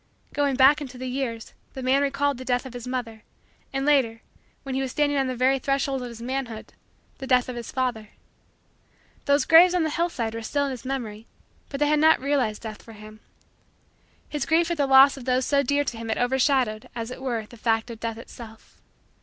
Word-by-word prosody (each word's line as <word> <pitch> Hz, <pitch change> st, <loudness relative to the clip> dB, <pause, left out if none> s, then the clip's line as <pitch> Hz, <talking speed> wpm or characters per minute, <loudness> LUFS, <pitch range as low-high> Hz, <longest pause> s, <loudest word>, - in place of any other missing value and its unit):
Going 285 Hz, -2 st, +1 dB
back 275 Hz, +3 st, +5 dB
into 260 Hz, -3 st, -8 dB
the 255 Hz, -, -6 dB
years, 250 Hz, -3 st, -4 dB, 0.2 s
the 265 Hz, -, -7 dB
man 265 Hz, +2 st, +3 dB
recalled 280 Hz, -1 st, 0 dB
the -, -, -6 dB
death 250 Hz, 0 st, -1 dB
of 260 Hz, -, -9 dB
his 245 Hz, 0 st, -8 dB
mother; 235 Hz, -4 st, -4 dB, 0.5 s
and, 270 Hz, 0 st, -2 dB
later, 260 Hz, -6 st, +2 dB, 0.4 s
when 270 Hz, -2 st, -5 dB
he 265 Hz, -, -1 dB
was 265 Hz, -, -2 dB
standing 290 Hz, +2 st, 0 dB
on 270 Hz, -1 st, +1 dB
the 255 Hz, -, -3 dB
very 260 Hz, +2 st, +2 dB
threshold 275 Hz, 0 st, -1 dB
of 250 Hz, -, -5 dB
his 235 Hz, 0 st, -10 dB
manhood, 250 Hz, -3 st, -5 dB, 0.5 s
the 265 Hz, -, -6 dB
death 250 Hz, -1 st, +3 dB
of 255 Hz, -, -5 dB
his 235 Hz, -1 st, -7 dB
father. 240 Hz, -5 st, -2 dB, 1.2 s
Those 280 Hz, -1 st, +3 dB
graves 350 Hz, +2 st, +7 dB
on 350 Hz, -, +2 dB
the 315 Hz, -, -1 dB
hillside 295 Hz, -10 st, -2 dB
were 230 Hz, -, -5 dB
still 285 Hz, +6 st, -1 dB
in 275 Hz, -, -3 dB
his 255 Hz, -1 st, -8 dB
memory 230 Hz, -5 st, -5 dB, 0.4 s
but 275 Hz, -, -5 dB
they 295 Hz, -, +3 dB
had 300 Hz, 0 st, +3 dB
not 315 Hz, +1 st, +5 dB
realized 260 Hz, -6 st, -1 dB
Death 215 Hz, -2 st, -7 dB
for 225 Hz, -, -13 dB
him. 215 Hz, 0 st, -13 dB, 1.1 s
His 295 Hz, -, -3 dB
grief 335 Hz, +1 st, +2 dB
at 340 Hz, -, -1 dB
the 285 Hz, -2 st, +1 dB
loss 270 Hz, +1 st, +7 dB
of 255 Hz, -, -9 dB
those 255 Hz, 0 st, +1 dB
so 280 Hz, -1 st, +2 dB
dear 285 Hz, +2 st, +1 dB
to 245 Hz, -5 st, -5 dB
him 225 Hz, 0 st, -6 dB
had 220 Hz, -, 0 dB
overshadowed, 250 Hz, -3 st, +1 dB
as 230 Hz, 0 st, -5 dB
it 255 Hz, -, -8 dB
were, 235 Hz, -5 st, -2 dB
the 235 Hz, -, -15 dB
fact 225 Hz, +1 st, 0 dB
of 225 Hz, -, -9 dB
Death 225 Hz, -1 st, -4 dB
itself. 225 Hz, -1 st, -13 dB
260 Hz, 220 wpm, -25 LUFS, 230-280 Hz, 1.2 s, graves